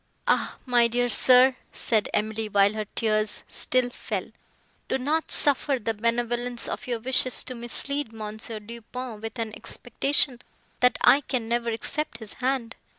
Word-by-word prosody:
"Ah! - - 0
my 240 -2 +4
dear 245 +1 0
sir," 255 +1 +6 0.2
said 220 -3 +1
Emily, 215 +1 -2
while 200 0 +3
her 215 -1 -5
tears 215 -2 0
still 250 -1 +2
fell, - - -5 0.6
"do - - 0
not 300 +5 -1
suffer 280 -1 +4
the 225 -1 -3
benevolence 240 +2 -1
of - - -6
your 240 -2 -2
wishes 255 +1 +2
to 255 - -7
mislead 250 +3 0
Mons. 215 -1 -6
Du 230 +1 -8
Pont 245 -1 -8
with 225 +2 -7
an 225 -2 -4
expectation 250 +2 -1 0.4
that 250 0 +3
I 280 - +5
can 240 -5 -3
ever 235 0 -1
accept 230 +4 -3
his 220 -3 -7
hand. 250 -3 -2
235 Hz, 155 wpm, -25 LUFS, 220-255 Hz, 0.6 s, sir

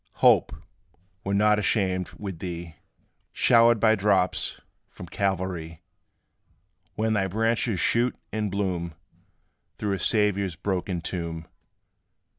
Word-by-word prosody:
Hope, - - +4 0.7
we - - -4
're - - +2
not 105 0 +4
ashamed, 95 -4 0
with 95 -5 -6
thee 85 -2 -6 0.6
Showered 115 -1 +5
by 110 0 +5
drops 100 -3 +1 0.3
from - - -10
Calvary, 90 -3 -3 1.1
When 110 0 0
thy 100 -2 +1
branches 115 0 0
shoot 120 +7 +2 0.2
and 105 -1 -2
bloom 90 -4 -2 0.8
Through 105 -2 -1
a 95 - -2
Saviour's 100 -2 +1
broken 90 -1 -2
tomb. 85 -2 -4
95 Hz, 110 wpm, -26 LUFS, 90-105 Hz, 1.1 s, Showered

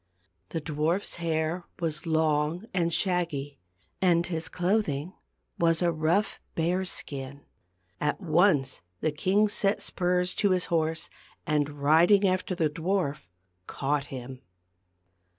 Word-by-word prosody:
The 165 - -3
dwarfs 160 +6 -1
hair 165 +1 -1
was 165 -1 -2
long 160 +3 +1
and 170 -2 +1
shaggy, 165 -7 -1 0.4
and 175 -2 +3
his 165 -2 -3
clothing 180 -4 0 0.5
was 165 0 +3
a 170 - +3
rough 165 +6 0 0.2
bear's 180 +3 0
skin. 140 0 -4 0.5
At 150 0 0
once 165 -6 +2 0.2
the 155 - +1
king 190 +8 +2
set 200 0 +1
spurs 180 0 0
to 205 - +3
his 185 -2 +2
horse, 160 -1 0 0.4
and 150 -3 +1
riding 175 +7 +5
after 185 0 0
the 165 -3 +2
dwarf 160 - -2 0.4
caught 140 +1 -1
him. 130 -1 -8
165 Hz, 120 wpm, -28 LUFS, 150-180 Hz, 0.5 s, riding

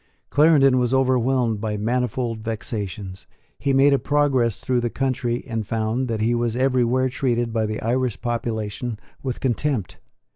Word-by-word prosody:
Clarendon 145 -4 +5
was 125 +1 +1
overwhelmed 125 -4 +2
by 105 -1 -2
manifold 120 +1 -1
vexations. 105 -4 -5 0.3
He 140 - 0
made 135 +1 +5
a 140 - +3
progress 140 -6 +1
through 125 -2 0
the 120 - -1
country, 125 -2 -1
and 115 -3 -4
found 115 +3 -1
that 115 -2 -2
he 115 +2 +2
was 120 0 0
everywhere 130 -1 +2
treated 120 -3 -1
by 110 -1 +1
the 110 0 -3
Irish 125 0 0
population 115 -1 -3 0.2
with 130 -3 -4
contempt. 130 -4 -1
120 Hz, 150 wpm, -23 LUFS, 110-130 Hz, 0.3 s, Clarendon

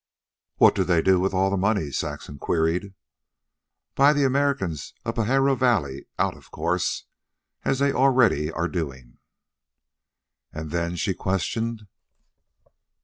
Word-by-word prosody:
"What - - +6
do 95 - +1
they 85 -2 +2
do 95 -1 +4
with 95 +2 +1
all 95 +1 +1
the 100 - 0
money?" 95 -6 0
Saxon 70 +2 -5
queried. 85 +6 -1 1.0
"Buy 140 +2 +5
the 145 -1 +1
Americans 130 - -1
of 115 - -2
Pajaro 135 +4 +2
Valley 105 - 0
out, - - 0
of - - -18
course, - - -1 0.6
as 135 - +1
they 140 +1 +2
are - - -6
already 125 - +3 0.2
doing." 70 -8 -5 1.3
"And 80 -1 -7
then?" 85 +1 -1
she 95 +2 -1
questioned. 110 +4 -2
95 Hz, 130 wpm, -24 LUFS, 80-125 Hz, 1.3 s, What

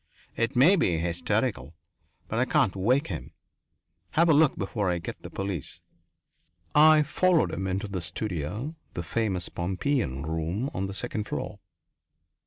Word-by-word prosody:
It 115 +1 -1
may 150 +11 +6
be 90 - +2
hysterical, 85 -4 -1 0.5
but 110 - -2
I 125 - +3
can't 130 -9 +2
wake 125 +9 +2
him. 75 -10 -6 0.8
Have 170 +2 +4
a - - +7
look 150 -1 +4
before 100 0 -1
I 90 - +1
get 85 - -7
the - - -8
police." 95 -7 -5 0.9
I 155 0 +7
followed 175 +3 +2
him 95 - -2
into 95 +3 -2
the 95 -3 -4
studio, 105 - -4 0.2
the 85 - -3
famous 95 0 -1
Pompeian 90 - -1
room, 80 - -2
on 95 +1 -2
the 95 - -6
second 110 -1 -3
floor. 105 - -5
100 Hz, 150 wpm, -27 LUFS, 85-135 Hz, 0.9 s, a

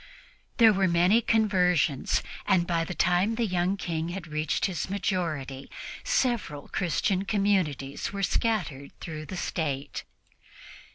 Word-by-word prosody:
There 225 -3 +7
were 195 -1 +2
many 180 +6 +4
conversions, 180 - +2 0.2
and 185 -3 +4
by 170 -2 +1
the 180 - -5
time 180 +5 +2
the 235 0 +1
young 185 0 0
King 165 -3 -3
had 180 0 -5
reached 155 -1 -1
his 185 -3 -2
majority, 165 -9 -2 0.3
several 240 - 0
Christian 185 +2 0
communities 190 -10 0
were 200 0 -3
scattered 180 - -1
throughout 155 -2 -6
the 185 - -6
State. 145 -6 -3
180 Hz, 125 wpm, -27 LUFS, 155-200 Hz, 0.3 s, There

